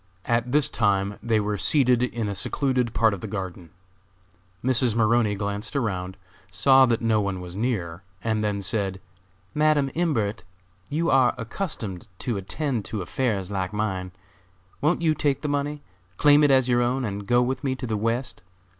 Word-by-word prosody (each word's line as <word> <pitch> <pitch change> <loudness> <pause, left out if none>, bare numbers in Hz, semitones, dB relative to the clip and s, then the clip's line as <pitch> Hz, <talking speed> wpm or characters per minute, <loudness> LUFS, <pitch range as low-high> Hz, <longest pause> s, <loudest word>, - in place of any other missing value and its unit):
At 120 +1 0
this 145 -1 +5
time 100 -2 0
they 115 -2 +1
were 105 -1 -2
seated 125 +3 +3
in 120 -3 -1
a 100 - -2
secluded 125 +3 0
part 110 -2 +4
of 100 - -6
the 110 - -5
garden. 95 -4 -6 0.9
Mrs. 125 -2 +2
Maroney 115 -2 +3
glanced 100 +4 -3
around, 95 -8 -2 0.3
saw 130 +9 +5
that 115 -1 0
no 110 -2 +3
one 100 -2 -2
was 90 0 -8
near, 95 -7 -2 0.2
and 110 -1 0
then 100 -1 -1
said: 95 -1 -2 0.5
"Madam 150 -2 +2
Imbert, 115 - -1 0.5
you 165 +3 0
are 130 -2 +4
accustomed 115 - -5
to 120 +1 -2
attend 120 +4 -2
to 105 -4 -4
affairs 100 -3 -2
like 95 0 -2
mine; 95 -4 -2 0.7
won't 160 +4 +1
you 160 -2 +4
take 145 -3 0
the - - -1
money, 145 0 -2 0.3
claim 145 0 +6
it 145 - +5
as 130 -2 +4
your 120 -1 +3
own, 125 +2 0
and 100 -1 -5
go 120 +2 +4
with 130 +1 -2
me 130 -2 0
to 130 - -6
the 110 -3 -2
West? 115 +4 -2
115 Hz, 170 wpm, -25 LUFS, 100-130 Hz, 0.9 s, claim